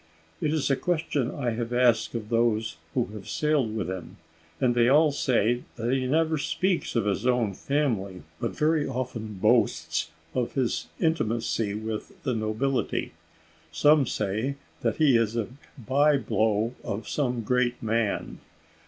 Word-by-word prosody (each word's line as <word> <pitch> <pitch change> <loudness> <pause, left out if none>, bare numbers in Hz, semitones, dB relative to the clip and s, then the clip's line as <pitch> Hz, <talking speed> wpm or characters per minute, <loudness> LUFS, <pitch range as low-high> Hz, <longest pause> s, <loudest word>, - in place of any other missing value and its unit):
"It 150 - +1
is 155 -3 +1
a - - +4
question 155 -6 -1
I 125 -5 -2
have 115 +1 -3
asked 120 -2 +3
of 110 -2 -4
those 115 -5 +1 0.2
who - - +2
have 105 -1 -9
sailed 145 -7 +1
with 110 - -2
him, 95 -1 -6 0.4
and 125 -3 +3
they 120 0 +4
all 150 +2 +5
say 120 -3 +1
that 120 +2 -1
he 130 -1 0
never 160 +2 +2
speaks 180 +3 -1
of 115 - +2
his 105 +4 0
own 120 -5 +2
family, 105 - -1 0.2
but - - -1
very 155 -1 +2
often 120 -5 -4
boasts 115 +4 +2 0.2
of 125 -2 -1
his 130 -4 -1
intimacy 115 - 0
with 110 - -6
the 130 - 0
nobility. 110 +5 -1 0.6
Some 145 - +4
say 110 +9 -1 0.3
that - - +1
he 150 -5 +4
is 115 -1 0
a 115 -2 -1 0.3
bye 140 +4 +3
blow 110 -1 +1
of 100 +3 -4
some 125 -5 -1
great 125 +1 0
man." 110 -1 -1
120 Hz, 155 wpm, -27 LUFS, 110-140 Hz, 0.6 s, all